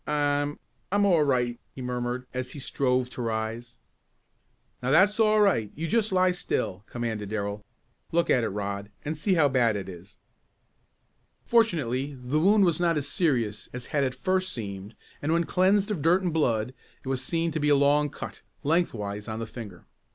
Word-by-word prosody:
"I 145 0 +1 0.4
I'm 205 +1 +3
all 175 -5 +4
right," 125 -4 +1 0.2
he 130 - -7
murmured, 125 0 -3
as 130 0 -4
he 145 - -7
strove 125 -2 0
to - - -6
rise. 115 +1 -3 1.0
"Now 125 - -1
that's 190 +9 +4
all 215 -1 +4
right 115 - +2
you 165 +3 -3
just 220 +2 +1
lie 185 0 +4
still," 105 - -2
commanded 110 -4 -4
Darrell. 100 -1 -3 0.5
"Look 170 +1 +2
at 125 - +3
it - - 0
Rod, 100 0 -4 0.2
and 155 +2 -2
see 185 +5 +1
how 155 -4 +5
bad 120 -5 +2
it 100 -2 -4
is." 95 +1 -11 1.3
Fortunately 145 - +1
the 125 +5 0
wound 200 +4 +5
was 170 -3 +1
not 170 -2 +2
as 145 -1 -2
serious 120 - 0
as 125 -1 -6
had 145 -2 +2
at 130 -2 -1
first 185 +6 0
seemed 100 -2 -6 0.3
and 155 +3 0
when 170 0 +3
cleansed 195 +4 +2
of 185 -8 -2
dirt 175 +5 +3
and 175 -3 -1
blood 125 -6 +1 0.3
it - - -11
was 130 -1 -1
seen 165 +4 -1
to 155 - -2
be 150 0 +1
a 145 - +6
long 145 +1 +3
cut, 140 - -8 0.2
lengthwise 110 - -1
of 110 -1 -4
the 115 - -3
finger. 105 -6 -10
135 Hz, 185 wpm, -27 LUFS, 115-170 Hz, 1.3 s, a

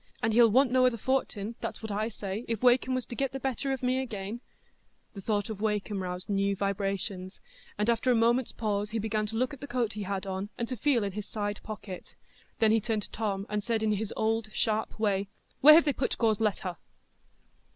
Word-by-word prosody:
And 220 0 +2
he'll 235 0 +7
want 255 +3 +4
no 255 0 +5
other 240 -2 0
fortin, 230 -3 -1
that's - - -5
what 220 - -4
I 215 +2 -1
say—if 215 +2 -4
Wakem 255 +1 +4
was 255 - -2
to - - -8
get 270 +2 -1
the 270 - -3
better 270 +1 -2
of 265 -1 -3
me 255 +1 +2
again——" 220 -2 -5 0.7
The 200 - -8
thought 205 0 0
of 215 -2 -6
Wakem 210 -2 -1
roused 180 0 -4
new 200 0 +1
vibrations, 195 -1 -2 0.4
and 210 - 0
after 235 +2 +2
a 250 - +5
moment's 235 +2 +3
pause 210 -2 -1
he 225 - -2
began 215 0 -1
to 225 - -5
look 255 +5 0
at 275 - -10
the 285 - -6
coat 240 -4 -1
he 210 - -5
had 195 0 -3
on, 190 +1 -3
and 235 - -2
to 255 - -2
feel 245 -1 +2
in 200 - -2
his 210 +1 -6
side 205 -1 -3
pocket. 205 -4 -8 0.4
Then 220 -1 +4
he 225 0 +3
turned 215 -1 -1
to - - -10
Tom, 200 -3 -2
and 210 0 -2
said 225 -1 0
in 215 - +2
his 210 0 -1
old 220 0 0
sharp 220 0 0
way, 200 -2 +1 0.3
"Where 305 +3 +10
have 330 - +6
they 290 - +2
put 260 - -1
Gore's 220 -2 +2
letter?" 195 -5 -1
220 Hz, 225 wpm, -29 LUFS, 200-240 Hz, 0.7 s, Where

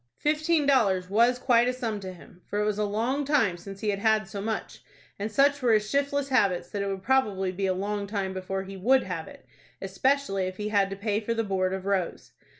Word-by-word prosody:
Fifteen 310 +1 +1
dollars 195 -9 +2
was 235 +4 +4
quite 240 -1 +3
a 250 - +1
sum 230 -5 -3
to 190 -1 -7
him, 180 0 -15
for 205 - -2
it 210 - +1
was 210 0 -1
a 210 - +1
long 230 +8 -1
time 265 - +2
since 195 +3 -10
he 215 - -1
had 200 -1 -1
had 215 -1 +2
so 200 0 -6
much, 220 +1 -4 0.4
and 210 +2 -3
such 280 +4 +3
were 240 -3 +3
his 215 -1 +2
shiftless 280 +2 0
habits, 200 -9 +1
that 205 - -3
it 200 - -2
would 195 -1 -4
probably 205 -8 +1
be 195 +1 -2
a 185 - +1
long 200 +1 -3
time 195 -2 -3
before 190 +1 -4
he 195 0 -9
would 255 +8 +3
have 175 -4 -5
it, - - -14 0.3
especially 195 0 0
if 185 0 -7
he 210 0 -3
had 200 -2 +2
to 195 - -5
pay 205 +1 -1
for 230 +1 -2
the 225 - 0
board 190 -2 0
of 190 0 -4
Rose. 195 -3 -2
205 Hz, 240 wpm, -27 LUFS, 195-250 Hz, 0.4 s, was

